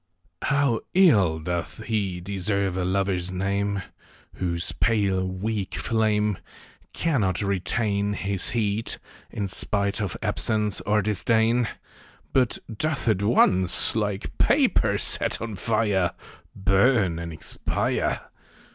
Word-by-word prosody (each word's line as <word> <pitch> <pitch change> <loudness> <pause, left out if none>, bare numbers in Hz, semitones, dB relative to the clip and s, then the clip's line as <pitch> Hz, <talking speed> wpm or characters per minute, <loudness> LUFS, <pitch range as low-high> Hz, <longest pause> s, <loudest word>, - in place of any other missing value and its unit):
HOW 140 -5 +1
ill 105 - +5
doth 85 +6 -4
lie 100 -5 -1
deserve 100 0 -1
a 95 - -1
Lover's 95 -1 0
name 100 +1 -1 0.5
Whose 85 -2 0
pale 100 -5 +1
weak 100 +2 -3
flame 105 -3 +1 0.5
Cannot 105 - 0
retain 100 +1 0
His 100 -1 -2
heat, 110 -1 -1 0.3
in 100 -2 -3
spite 100 +1 -1
of 100 - -3
absence 105 -3 0
or 105 0 +3
disdain; 110 +3 +2 0.7
But 130 -3 +2 0.2
doth 150 +2 -1
at 105 -4 +2
once, 95 -4 +3
like 105 -3 -2
paper - - +3
set - - -1
on 115 -1 -5
fire, 100 -2 +1 0.4
Burn 95 -2 +3
and 85 0 -5
expire 80 - -1
100 Hz, 110 wpm, -25 LUFS, 95-110 Hz, 0.7 s, ill